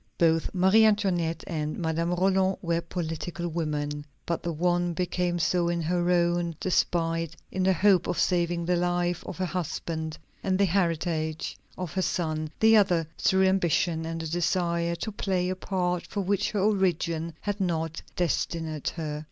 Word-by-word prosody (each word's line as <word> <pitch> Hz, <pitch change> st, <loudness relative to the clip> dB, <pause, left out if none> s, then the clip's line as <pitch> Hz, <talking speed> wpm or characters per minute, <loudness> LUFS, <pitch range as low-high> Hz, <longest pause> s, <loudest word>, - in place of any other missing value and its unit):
Both 165 Hz, -1 st, +3 dB
Marie 190 Hz, +5 st, +5 dB
Antoinette 190 Hz, -6 st, +2 dB
and 155 Hz, -3 st, -3 dB
Madame 165 Hz, +1 st, 0 dB
Roland 190 Hz, +1 st, +2 dB
were 170 Hz, -1 st, 0 dB
political 170 Hz, +1 st, -4 dB
women. 150 Hz, -3 st, -2 dB, 0.2 s
But 170 Hz, -, -2 dB
the 170 Hz, -, -2 dB
one 175 Hz, +2 st, +1 dB
became 180 Hz, 0 st, 0 dB
so 170 Hz, +1 st, +1 dB
in 170 Hz, 0 st, 0 dB
her 175 Hz, +2 st, 0 dB
own 175 Hz, -1 st, +2 dB
despite, 165 Hz, -2 st, 0 dB, 0.2 s
in 190 Hz, -, -2 dB
the 190 Hz, +1 st, +4 dB
hope 190 Hz, -1 st, +4 dB
of -, -, -1 dB
saving 175 Hz, -1 st, +1 dB
the 175 Hz, 0 st, +2 dB
life 175 Hz, 0 st, 0 dB
of -, -, -6 dB
her 185 Hz, -, 0 dB
husband 160 Hz, -2 st, -3 dB, 0.3 s
and 185 Hz, -1 st, +1 dB
the 200 Hz, -, +4 dB
heritage 165 Hz, -3 st, -1 dB, 0.2 s
of 180 Hz, -4 st, -5 dB
her 190 Hz, -, 0 dB
son; 155 Hz, -3 st, -1 dB
the 220 Hz, 0 st, +6 dB
other, 180 Hz, -5 st, +3 dB
through 190 Hz, 0 st, +3 dB
ambition 170 Hz, -3 st, +1 dB
and 165 Hz, 0 st, -4 dB
the 165 Hz, -, -4 dB
desire 170 Hz, 0 st, 0 dB
to 220 Hz, +6 st, -4 dB
play 185 Hz, -3 st, -1 dB
a 185 Hz, -, -1 dB
part 180 Hz, -2 st, -2 dB
for 205 Hz, -, -3 dB
which 195 Hz, +1 st, 0 dB
her 210 Hz, -, -1 dB
origin 170 Hz, -5 st, +1 dB
had 205 Hz, -1 st, -3 dB
not 165 Hz, -3 st, -1 dB
destined 160 Hz, -3 st, -1 dB
her. 150 Hz, -3 st, -3 dB
175 Hz, 165 wpm, -27 LUFS, 165-185 Hz, 0.3 s, the